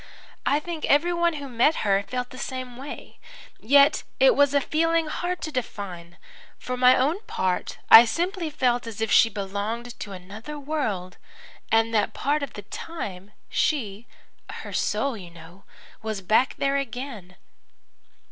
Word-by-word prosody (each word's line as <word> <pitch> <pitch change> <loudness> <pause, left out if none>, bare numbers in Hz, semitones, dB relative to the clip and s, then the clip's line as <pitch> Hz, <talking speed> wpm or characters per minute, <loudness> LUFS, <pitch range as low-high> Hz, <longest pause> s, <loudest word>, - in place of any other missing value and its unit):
I 285 - +3
think 325 0 -6
everyone 340 +3 +2
who 285 -2 -6
met 250 +5 +2
her 195 -1 +3
felt 250 +4 -5
the 255 - -10
same 255 -2 -5
way. 270 +4 -9 0.4
Yet 280 +5 +5 0.2
it - - +6
was 285 0 +3
a - - +6
feeling 330 +3 +1
hard 355 +3 -3
to 310 - -4
define. 185 - -6 0.4
For 255 - -4
my 250 0 +6
own 300 +10 +1
part 185 -1 -2
I 230 - +11
simply 345 - -2
felt 245 -5 0
as 220 -2 -7
if 225 -1 -1
she 230 - +6
belonged 210 +4 -4
to 205 - -6
another 205 +10 -8
world, 245 - -3 0.5
and 225 0 +3
that 210 -2 +1
part 295 +2 0
of 280 - -5
the 205 - -8
time 200 - -7 0.2
she 230 -7 -1 0.4
her - - -8
soul, 275 -3 0
you 185 -5 -10
know 170 +3 -15 0.4
was 215 -2 -4
back 220 +7 +2
there 275 0 +1
again. 245 -8 -6
250 Hz, 155 wpm, -25 LUFS, 205-295 Hz, 0.5 s, I